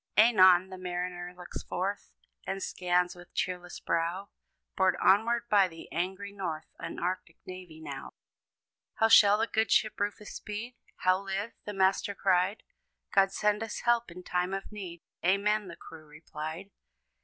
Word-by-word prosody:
Anon, 190 -5 +7
the 185 - -8
mariner 180 0 -4
looks 180 -1 -7
forth, 195 +3 -3 0.4
And 195 0 -3
scans 180 0 +1
with 175 0 -15
cheerless 180 -1 -3
brow, 170 +4 -1 0.5
Borne 190 -1 +3
onward 230 +4 +4
by 200 -4 +5
the 165 -2 -12
angry 190 +4 -3
North, 170 -6 -4
An 165 - -6
arctic 175 -2 -3
navy 185 -4 -9
now. 140 -4 -8 0.8
"How 225 -1 +3
shall 205 -2 +8
the 225 - +2
good 220 -1 0
ship 215 - +2
Rufus 205 0 -3
speed? 215 +4 -6 0.2
How 185 0 +2
live?" 200 +3 -3
the 210 - -4
master 195 +1 +2
cried; 190 +2 +1 0.5
"God 195 -1 +5
send 210 +1 +1
us 225 -1 -4
help 240 -2 +2
in 180 +1 -10
time 180 +2 -1
of 195 - -6
need," 180 -5 -8 0.2
"Amen!" 200 +3 +2
the 170 - -8
crew 155 -1 -12
replied. 155 +4 -7
190 Hz, 155 wpm, -30 LUFS, 175-205 Hz, 0.8 s, shall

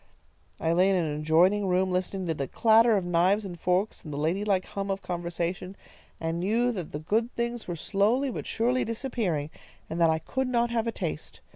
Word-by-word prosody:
"I 165 - 0
lay 180 +3 +4
in 195 - +3
an 155 -4 -1
adjoining 180 +6 +3
room, 185 +1 +1
listening 185 +1 -2
to 165 - 0
the 140 -3 -3
clatter 225 - +4
of 190 - -2
knives 180 +4 +2
and 175 -3 -7
forks, 185 +5 0
and 155 - -8
the 140 - -4
ladylike 185 +5 0
hum 200 0 -5
of 195 0 -2
conversation, 175 +2 -3 0.4
and 165 +1 -2
knew 230 +7 +1
that 185 -8 -5
the - - -4
good 220 +10 0
things 235 0 -3
were 175 - -3
slowly 220 - +1
but - - -6
surely 245 +3 +1
disappearing, 220 - -2 0.4
and 165 +1 -2
that 165 - +5
I 160 - +2
could 260 +11 -2
not 240 -1 +1
have 230 -1 0
a - - 0
taste. - - -5
190 Hz, 205 wpm, -27 LUFS, 170-225 Hz, 0.4 s, that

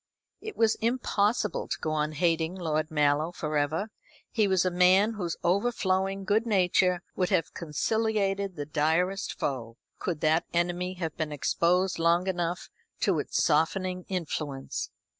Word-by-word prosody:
It 435 -1 -7
was 225 -1 +4
impossible 225 -2 0
to - - -2
go 155 - -2
on 155 0 -1
hating 165 +1 +1
Lord 155 -3 -1
Mallow 150 +1 +2
for 155 -3 -4
ever. 155 +9 0 0.4
He 215 -3 +2
was 190 -2 +2
a 185 - +1
man 185 +5 +4
whose 180 -6 -3
overflowing 195 0 +1
good 220 +4 +1
nature 180 -3 +2
would 180 -1 0
have 180 -5 0
conciliated 200 +3 -1
the 145 -3 -4
direst 165 +6 0
foe, 115 -4 -3 0.2
could 170 -5 -3
that 160 +1 +2
enemy 175 +2 0
have 165 -4 -4
been 155 -2 -2
exposed 175 +5 +1
long 170 +2 +3
enough 175 -2 -2 0.3
to - - +2
its - - 0
softening 180 +4 +1
influence. 155 -7 -3
180 Hz, 145 wpm, -28 LUFS, 160-195 Hz, 0.4 s, was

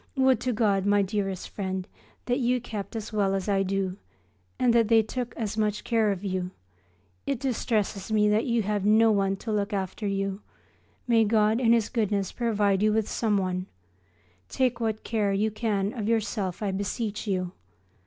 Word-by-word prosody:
Would 260 -3 +4
to 255 - -1
God, 210 -4 +2
my 205 0 +4
dearest 195 -1 -2
friend, 190 -2 -4 0.4
that 245 +2 0
you 250 0 +2
kept 210 -3 -6
as 220 0 -5
well 195 -2 +1
as 195 +1 -3
I 195 -1 +2
do, 195 -1 -1 0.6
and 245 -2 +3
that 230 -2 +4
they 225 0 +5
took 245 +2 -5
as 220 -1 -3
much 210 -1 0
care 225 -3 +2
of 195 -1 -4
you! 185 -2 -2 0.8
It 275 -4 -1
distresses 220 -6 -1
me 210 -1 +4
that 210 +5 +2
you 235 -2 +1
have 205 0 -1
no 220 +2 +5
one 195 -2 +1
to 220 +3 -6
look 205 0 -1
after 195 +2 -3
you. 195 0 -2 0.7
May 230 -2 +5
God 215 +1 +3
in 230 -2 +4
His 230 -3 +3
goodness 205 -5 -1
provide 205 -5 +1
you 215 0 +4
with 215 -1 +1
someone! 190 -4 0 0.8
Take 250 -2 0
what 220 -2 -2
care 210 -3 0
you 210 +2 +1
can 210 -2 -1
of 220 -4 -3
yourself, 210 -4 -1
I 200 - 0
beseech 205 +3 -3
you. 185 -3 -1
210 Hz, 180 wpm, -27 LUFS, 195-225 Hz, 0.8 s, they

